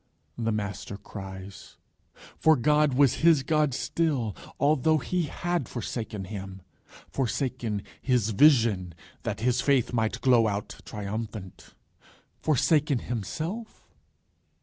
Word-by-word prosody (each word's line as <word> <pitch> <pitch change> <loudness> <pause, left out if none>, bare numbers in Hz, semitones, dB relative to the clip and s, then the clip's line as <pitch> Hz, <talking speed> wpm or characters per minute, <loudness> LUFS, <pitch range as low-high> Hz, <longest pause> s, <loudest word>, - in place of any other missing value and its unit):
the 115 -1 -1
Master 100 -1 -4
cries. 95 -1 -9 0.6
For 160 0 +5
God 150 +1 +3
was 135 -2 +4
his 160 -4 +5
God 150 0 +2
still, 145 - -1 0.2
although 155 +2 +3
he 180 +2 -1
had 170 -2 -2
forsaken 110 -3 -4
him 95 -1 -7 0.4
forsaken 125 -5 -2 0.2
his 125 -5 +1
vision 110 - +4 0.3
that 100 0 -4
his 125 +1 +2
faith 135 -4 +2
might 110 -2 0
glow 120 -4 +5
out 100 -1 -3
triumphant; 105 -2 -6 0.7
forsaken 150 -1 +3
himself? 160 - -5
120 Hz, 105 wpm, -27 LUFS, 105-150 Hz, 0.7 s, For